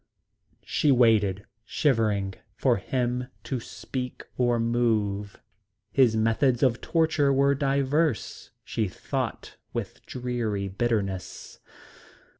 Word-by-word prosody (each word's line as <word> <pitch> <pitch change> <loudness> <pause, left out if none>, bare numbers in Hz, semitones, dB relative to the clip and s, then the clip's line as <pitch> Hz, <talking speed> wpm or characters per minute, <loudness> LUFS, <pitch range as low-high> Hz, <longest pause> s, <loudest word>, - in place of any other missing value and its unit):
She 150 - +2
waited, 105 -6 +3 0.2
shivering, 110 - +1 0.2
for - - +2
him 125 +4 -1 0.2
to 130 - -3
speak 125 +2 -6
or 120 -2 +2
move. 110 -4 0 0.5
His 125 -5 +4
methods 115 +3 +2
of 125 -2 +2
torture 155 -4 +2
were 140 +1 +4
diverse, 140 +1 0
she 110 - -1
thought 90 - -4 0.2
with - - -5
dreary 120 -5 -2
bitterness. 100 -2 -3
120 Hz, 95 wpm, -26 LUFS, 105-130 Hz, 0.5 s, His